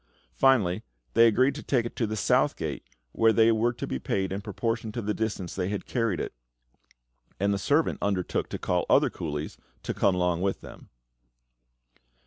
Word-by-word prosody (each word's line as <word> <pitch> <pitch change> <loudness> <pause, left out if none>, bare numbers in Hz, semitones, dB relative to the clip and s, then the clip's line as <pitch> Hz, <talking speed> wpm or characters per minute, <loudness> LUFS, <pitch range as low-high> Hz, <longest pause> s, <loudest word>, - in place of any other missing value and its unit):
Finally, 95 - +3 0.3
they 115 +1 +7
agreed 130 +5 +3
to 150 - -7
take 125 -4 0
it 120 - -6
to 115 - 0
the 110 - -3
South 105 - +2
Gate, - - -4 0.3
where 115 - +4
they 115 0 +5
were 115 +2 +2
to 120 - -5
be 65 - -3
paid 95 +5 -1
in 95 +1 -3
proportion 115 +1 -3
to 120 - -4
the 105 -1 -1
distance 105 -6 -3
they 95 -1 -2
had 100 -1 -4
carried 115 -9 -1
it; - - -4 1.1
and 100 +1 +2
the 100 - -1
servant 145 +9 +1
undertook 95 -3 -1
to - - -4
call - - -1
other - - +4
coolies 75 -1 -5 0.3
and - - -2
come 100 -2 +2
along 90 -1 0
with 95 0 -1
them. - - -13
105 Hz, 185 wpm, -27 LUFS, 95-115 Hz, 1.1 s, they